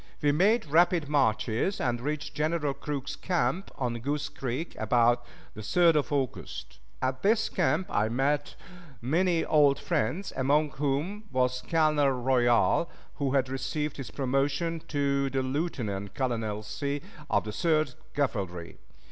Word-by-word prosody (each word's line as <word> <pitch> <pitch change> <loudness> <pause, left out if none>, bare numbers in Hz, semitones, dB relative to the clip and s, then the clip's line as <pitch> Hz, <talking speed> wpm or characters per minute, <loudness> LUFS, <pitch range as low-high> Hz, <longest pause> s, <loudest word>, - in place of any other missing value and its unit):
We 145 - +3
made 205 +10 +3
rapid 165 +1 +3
marches, 130 - +1
and 120 -3 -1
reached 150 +2 -3
General 150 -1 0
Crook's 140 -1 -4
camp 175 0 -1
on 120 -3 -2
Goose 145 +4 -2
Creek 135 +6 -4
about 120 +2 +3 0.3
the 110 - -8
3d 170 +9 +4
of 150 0 0
August. 135 -4 -3 0.2
At 130 0 -1
this 220 +2 +2
camp 180 0 +1
I 110 +1 +1
met 140 +4 0 0.4
many 165 - +1
old 145 -3 +4
friends, 130 - -1
among 145 +3 +2
whom 150 +10 -2
was 125 0 +1
Colonel 155 -3 +3
Royal, 125 +4 +2 0.3
who 140 -2 -1
had 135 -2 +2
received 135 +3 -3
his 135 -5 -6
promotion 140 +5 0
to 140 -2 0
the 135 0 -1
lieutenant 120 - -3
colonelcy 115 +2 -2 0.3
of - - +2
the 105 - -5
Third 155 +1 +1 0.2
Cavalry. 95 -11 -2
140 Hz, 135 wpm, -28 LUFS, 125-155 Hz, 0.4 s, 3d